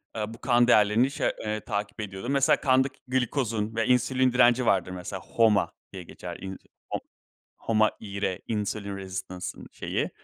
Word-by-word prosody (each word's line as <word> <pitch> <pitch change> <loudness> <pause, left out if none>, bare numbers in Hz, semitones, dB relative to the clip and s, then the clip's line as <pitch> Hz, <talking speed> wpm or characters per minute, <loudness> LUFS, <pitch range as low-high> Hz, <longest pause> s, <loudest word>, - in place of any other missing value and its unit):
Iıı, 110 0 -3
bu 115 - -13
kan 120 -2 +4
değerlerini 110 +3 +4
şey, - - 0
eee, 110 0 -2
takip 105 +1 -3
ediyordum. 100 +4 -5
Mesela 140 -1 +3
kandaki 130 0 +2
glikozun 120 -4 -1
ve 115 0 +1
insülin 130 0 +3
direnci 125 0 +5
vardır 90 -4 +2
mesela. 90 +1 -5
HOMA 105 -7 +2 0.2
diye 95 -2 -7
geçer - - -8
inc 95 0 -6 0.3
HO - - -1 0.6
HOMA 110 -1 +2
IR, 100 -3 -3
insulin 105 -2 -3
residence 95 -1 -6
ın - - -10
şeyi. - - -2
110 Hz, 160 wpm, -27 LUFS, 100-125 Hz, 0.6 s, direnci